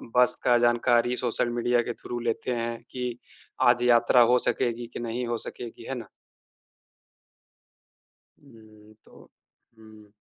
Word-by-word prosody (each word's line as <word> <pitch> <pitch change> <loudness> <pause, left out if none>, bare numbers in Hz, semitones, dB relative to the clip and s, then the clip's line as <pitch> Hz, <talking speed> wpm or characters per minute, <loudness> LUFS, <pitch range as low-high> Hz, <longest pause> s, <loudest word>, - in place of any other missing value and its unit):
बस 125 0 +5
का 120 -1 +4
जानकारी 120 0 +2
सोशल 120 0 -1
मीडिया 120 0 +2
के 120 - -4
थ्रू 120 +1 -7
लेते 120 +1 -2
हैं 115 0 -3
कि 125 -2 -4 0.5
आज 120 0 +3
यात्रा 120 0 +5
हो 125 - +4
सकेगी 120 0 -2
की - - -6
नहीं 120 +1 -3
हो 120 - -1
सकेगी। 115 +1 -8
है 135 - -2
ना? 115 -3 -7 2.3
हुँ, 110 -5 -18
तो - - -18 0.5
हुँ। 110 -1 -17
120 Hz, 135 wpm, -26 LUFS, 115-120 Hz, 2.3 s, बस